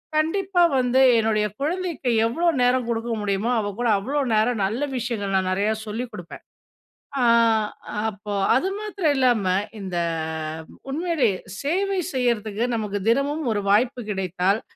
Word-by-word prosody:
கண்டிப்பா 360 +4 +1 0.2
வந்து 250 +1 +2 0.2
என்னோடய 215 -1 +2 0.2
குழந்தைக்கு, 330 -4 -2 0.2
எவ்ளோ 335 +10 0
நேரம் 250 0 +3
கொடுக்க 230 +1 -2
முடியுமோ, 205 +3 -1
அவ 205 -1 -2
கூட 245 - +1
அவ்ளோ 275 +8 -2 0.2
நேரம், 220 0 +2
நல்ல 225 +8 -2 0.2
விஷயங்கள் 220 -5 -3
நான் 185 0 0
நெறையா 205 +3 +1
சொல்லிக் 235 +3 -4
கொடுப்பேன். 175 -2 -9 0.8
ஆ - - +3 0.9
அப்போ, 205 0 -7 0.2
அது 370 +9 +1
மாத்திரம் 395 -8 0
இல்லாம, 245 -6 +3 0.3
இந்த 185 -3 -4 0.9
உண்மையிலே 320 -6 +1 0.3
சேவை 385 +5 0
செய்யிறதுக்கு, 230 -3 0
நமக்கு 210 -2 -2
தினமும் 285 +5 +1
ஒரு 205 - -1
வாய்ப்பு 245 +4 +2
கிடைத்தால், 190 +2 0
240 Hz, 130 wpm, -23 LUFS, 205-290 Hz, 0.9 s, நேரம்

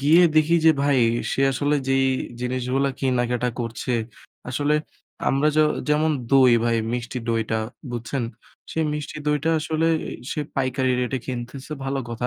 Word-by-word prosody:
গিয়ে 155 +6 +6
দেখি 155 +2 +5
যে 160 - +8
ভাই 140 -2 +3 0.3
সে - - -1
আসলে 145 +3 +1
যেই 135 0 +3 0.4
জিনিসগুলা 130 +2 0
কিনা 130 -2 +1
কেটা 125 0 0
করছে, 115 +2 -3 0.6
আসলে 145 +4 +1 0.5
আমরা 140 +3 +2
য - - +4 0.3
যেমন 155 +1 +3 0.2
দই 130 -3 +7
ভাই 115 -1 +2 0.2
মিষ্টি 125 +1 -3
দইটা 110 -1 0 0.3
বুঝছেন? 120 +2 -3 0.5
সেই 160 -1 0
মিষ্টি 150 +1 -5
দইটা 150 +2 +1
আসলে 160 +1 0 0.4
সে 150 - -2 0.2
পাইকারি 130 -1 +1
রেটে 125 +1 -1
কিনতেছে 130 +3 -6
ভালো 135 0 -1
কথা। 120 +1 -3
135 Hz, 145 wpm, -23 LUFS, 125-150 Hz, 0.6 s, যে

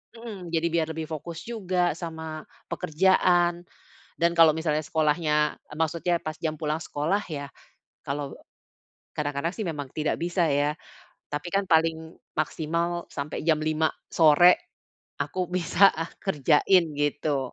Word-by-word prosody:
mhm, 215 -6 -8
jadi 165 0 0
biar 165 -1 +1
lebih 160 -1 -4
fokus 160 +2 -6
juga 185 -6 0
sama 160 -2 -6 0.3
pekerjaan. 175 +1 +2 0.6
Dan 170 +1 +3
kalau 165 -2 +7
misalnya 160 -2 0
sekolahnya 150 -1 +1 0.2
maksudnya 165 +2 +1
pas 155 +1 -4
jam 160 -1 -2
pulang 155 0 -1
sekolah 155 +8 0
ya, 140 -2 -4 0.6
kalau 140 -1 -4 0.8
kadang-kadang 145 +4 -2
sih 220 - -4
memang 150 -5 -4
tidak 155 0 -1
bisa 175 +1 +1
ya, 145 +1 +1 0.6
tapi 145 +2 -3
kan 195 -1 +1
paling 160 0 +1 0.2
maksimal 170 +3 -1
sampai 140 +2 -4
jam 155 -2 +3
5:00 155 0 +1 0.2
sore 165 +2 +6 0.6
aku 185 0 -1
bisa 185 +2 +4 0.3
kerjain, 170 +1 +3
gitu. 145 -2 -1
160 Hz, 125 wpm, -26 LUFS, 150-175 Hz, 0.8 s, kalau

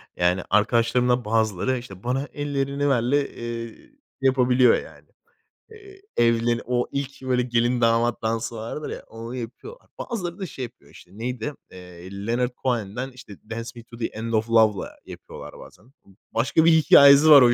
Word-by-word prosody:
yani, 90 +1 +1
arkadaşlarımdan 120 +3 +2
bazıları, 110 +2 0
işte, 100 -5 -10
"Bana 135 +4 -1
Ellerini 145 0 -1
Ver" 125 -4 +2
ile, 140 +3 +1
eee, 115 -1 -6 0.5
yapabiliyor, 130 -2 +4
yani. - - -11 0.6
Eee, 400 -3 -15 0.2
evleri 115 0 +2
o 125 0 0
ilk, 140 -1 -4
böyle, 130 -1 +1
gelin 120 0 +1
damat 115 +1 +2
dansı 115 +1 -2
vardır 115 +7 -6
ya, - - -7
onu 115 +2 -8
yapıyorlar. 130 - -9
Bazıları 180 -7 -5
da 190 - -3
şey 135 -6 -7
yapıyor 120 - -11
işte, 90 - -16
neydi? 125 +4 -4 0.2
Eee, 90 0 -12 0.2
Leonard 125 +2 0
Cohen'den 120 +1 -2
işte 125 -6 -13
"Dance 115 +1 -5
Me 120 - -10
to 115 -1 -14
the 115 - -2
End 115 +1 -5
of 110 +1 0
Love" 110 -3 +4
ile - - -5 0.2
yapıyorlar - - -11
bazen. 125 +5 -16 0.4
Başka 130 +8 +2
bir 170 - +7
hikâyesi 145 -1 +7
var 145 -3 +10
o 120 -1 +6
120 Hz, 165 wpm, -24 LUFS, 115-135 Hz, 0.6 s, var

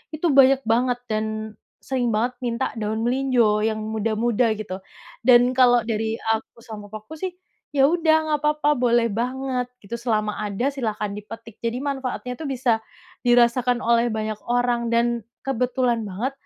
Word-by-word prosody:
itu 335 +3 0
banyak 265 0 +6
banget, 245 +1 +2
dan 215 0 -1 0.6
sering 255 -2 0
banget 240 +3 0
minta 235 +1 -1
daun 215 +1 -2
melinjo, 245 -5 +2
yang 220 0 0
muda-muda 220 +2 0
gitu. 190 -3 -6 0.4
Dan 245 +1 +5
kalau 245 -2 +6
dari 225 0 -1
aku 225 +1 -3
sama 210 -2 -9
papaku 215 +8 -9
sih, 370 - -1 0.4
ya 275 0 +5
udah 325 0 +3
nggak 300 - +2
apa-apa 300 0 +2
boleh 235 -1 +3
banget, 255 0 -2 0.2
gitu. 200 +4 -5
Selama 215 -3 0
ada 205 +5 -1
silakan 215 -5 -3
dipetik. 225 +1 -10
Jadi 230 +2 -1
manfaatnya 265 -3 -3
itu 315 - -7
bisa 250 -4 +1 0.4
dirasakan 245 0 +3
oleh 235 -1 +2
banyak 215 -1 -3
orang 240 -1 +1
dan, 235 -1 +1 0.2
kebetulan 250 -3 0
banget 215 +8 -3
240 Hz, 150 wpm, -23 LUFS, 220-255 Hz, 0.6 s, banyak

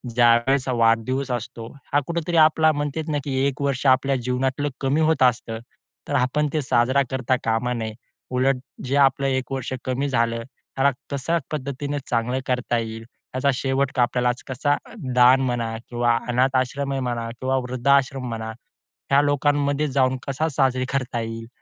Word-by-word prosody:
ज्यावेळेस 120 +3 +4
वाढदिवस 120 +3 +1
असतो, 115 -1 -5 0.3
हा 145 - +5
कुठेतरी 170 0 -1
आपला 155 0 +3
म्हणतेत 145 +2 -3
ना 150 - 0
की 135 -2 -2
1 140 0 -4
वर्ष 140 -1 -1
आपल्या 135 +1 -1
जीवनातलं 130 +3 -1
कमी 140 +4 +1
होत 160 -4 +1
आसतं. 115 -2 +1 0.5
तर 145 - -1
आपण 145 +3 +1
ते 155 - +1
साजरा 130 +1 +2
करता 130 -1 +1
कामा 115 +2 0
नये. 110 -2 -4 0.4
उलट 130 +1 +2 0.3
जे 140 - 0
आपलं 135 0 +3
1 130 0 -1
वर्ष 130 -2 -3
कमी 130 +2 -1
झालं, 115 -2 0
त्याला 135 +2 -1 0.2
कशा 140 +5 0
पद्धतीने 145 0 -3
चांगलं 120 +2 0
करता 125 -2 0
येईल 115 -1 -4 0.3
याचा 130 +2 +1
शेवट 135 +1 0
का 130 - +2
आपल्याला 125 0 +1 0.2
कसा 140 +3 +1 0.4
दान 125 +2 +6
म्हणा 120 -3 -1
किंवा 120 -1 +2
अनाथ 130 +2 +2
आश्रम 135 +2 -1
आहे 135 - -1
म्हणा 115 -1 -2
किंवा 130 +1 0
वृद्धाश्रम 130 +1 +1
म्हणा, 110 -1 -4 0.6
ह्या 140 +1 +6
लोकांमध्ये 145 0 +1
जाऊन 130 -1 +1
कसा 140 +4 0
साजरा 130 -3 +1
करता 125 -3 -1
येईल 115 0 -6
130 Hz, 160 wpm, -23 LUFS, 120-140 Hz, 0.6 s, दान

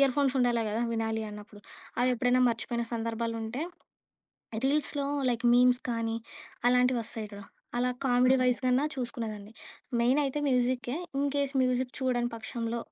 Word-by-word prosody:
Ear 270 -2 +4
phones 270 -1 +2
ఉండాలి 240 -2 +2
కదా! 230 +2 0
వినాలి 225 -1 -1
అన్నప్పుడు 210 0 -11 0.4
అవెప్పుడైనా 250 0 +3
మర్చిపోయిన 235 0 -2
సందర్భాలుంటే 230 +2 -3 1.0
రీల్స్‌లో 285 0 0 0.2
లైక్ 235 0 -2
మీమ్స్ 250 0 +5
కానీ 230 0 -1 0.5
అలాంటివి 250 0 +3
వస్తాయి 220 -1 -5
చూడు 200 - -9 0.3
అలా 250 +1 +2 0.2
కామెడీ 250 +1 +4
వైజ్ 250 -1 +3
కన్నా 255 +3 +3
చూసుకునేదాన్ని. 225 -5 -5 0.5
మెయినయితే 275 +4 +2
మ్యూజిక్కే. 250 0 +1 0.2
ఇన్‌కేస్ 280 0 0
మ్యూజిక్ 255 0 +1
చూడని 245 -2 +1
పక్షంలో 230 +1 -4
245 Hz, 125 wpm, -29 LUFS, 230-255 Hz, 1.0 s, మీమ్స్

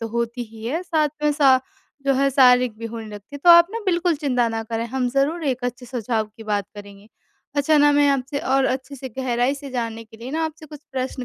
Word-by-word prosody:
तो 230 - -4
होती 235 +1 -2
ही 220 0 -11
है 325 +8 -2
साथ 315 -4 +1 0.2
में 295 - +3
श 265 -2 +6 0.5
जो 275 - +4
है 275 +1 +2
शारीरिक 250 -3 +4
भी 230 - -5
होने 230 0 -7
लगती 210 +7 -11
है - - -5
तो 350 - +8
आप 340 0 +9
ना 460 - -4
बिल्कुल 345 -2 +1
चिंता 250 -5 +1
ना 225 0 -3
करें, 225 +1 -3
हम 250 +1 -1
ज़रूर 295 +5 0
एक 255 -2 -1
अच्छे 245 +1 -4
सुझाव 230 -2 -2
की 225 - -10
बात 205 -1 -1
करेंगे। 205 0 -12 0.5
अच्छा 300 +2 +3
ना 290 0 +6
मैं 290 0 +4
आपसे 275 +1 -1
और 270 0 +1
अच्छे 265 +1 -2
से 260 0 -7
गहराई 250 +1 0
से 280 -1 -9
जानने 230 -2 -4
के 220 0 -16
लिए 240 +3 -8
ना 320 +2 -1
आपसे 315 0 -7
कुछ 300 -1 -11
प्रश्न 255 -1 -3
260 Hz, 240 wpm, -22 LUFS, 230-285 Hz, 0.5 s, आप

